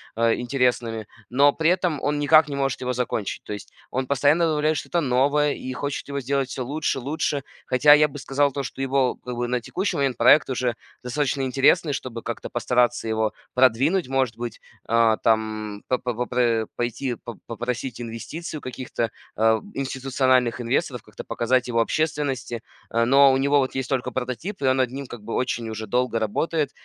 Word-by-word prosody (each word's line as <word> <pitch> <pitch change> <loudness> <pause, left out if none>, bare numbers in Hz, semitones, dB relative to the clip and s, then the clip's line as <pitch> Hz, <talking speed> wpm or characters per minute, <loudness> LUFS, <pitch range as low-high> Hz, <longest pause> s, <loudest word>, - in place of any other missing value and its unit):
а, 115 0 +3
интересными, 120 -3 0 0.2
но 140 +3 +5
при 160 +3 +2
этом 180 -5 0
он 145 0 0
никак 155 +2 +6
не 145 - -4
может 135 -1 -1
его 125 0 -1
закончить. 120 -4 -3
То - - -6
есть 105 - -9 0.2
он 130 +1 -1
постоянно 145 +5 +3
добавляет 155 -1 +1
что-то 170 - -1
новое 145 +2 +2
и 130 - -6
хочет 145 +2 -4
его 140 0 -2
сделать 135 0 -1
всё 130 - -4
лучше, 145 +1 -1
лучше. 145 +1 -2 0.2
Хотя 145 +3 +6
я 150 +1 +6
бы 140 - -9
сказал, 140 +1 +1
то 140 +1 -3
что 135 - -6
его, 135 -1 +1
как 125 -1 -7
бы, 120 0 -2
на 125 0 -1
текущий 190 - -2
момент- 135 -4 0
проект 145 - +6
уже 125 -2 -1 0.3
достаточно 135 +2 -1
интересный, 140 +4 +3
чтобы 125 -4 -5
как-то 115 - -5
постараться 120 -1 +1
его 110 -1 0 0.2
продвинуть. 130 +8 +3
Может 130 -4 +1
быть, 120 -1 -5 0.3
а, 115 -1 +4
там 110 -2 -1
по 125 - +2
попр 120 -2 0
пойти 120 +1 -2
по 115 0 -10
попросить 120 +1 -4
инвестиций 120 +9 -6
у - - -21
каких-то, 125 -2 -3 0.3
э, 110 0 +4
институциональных 130 -2 +1
инвесторов, 120 -1 -1
как-то - - -10
показать 125 +1 0
его 115 -1 +1
общественности, 135 -3 -1 0.3
э. 115 0 +2
Но 135 +2 +6
у 130 - +3
него 140 +2 +3
вот 130 -1 0
есть 130 -1 -2
только 130 -2 -1
прототип, 130 - -4
и - - 0
он 130 0 +3
над 130 -2 +1
ним 135 +1 -5
как 120 -4 -10
бы 115 - -5
очень 120 -3 -1
уже 110 0 -5
долго 125 +1 0
работает. 145 +8 -1
130 Hz, 185 wpm, -24 LUFS, 120-140 Hz, 0.3 s, никак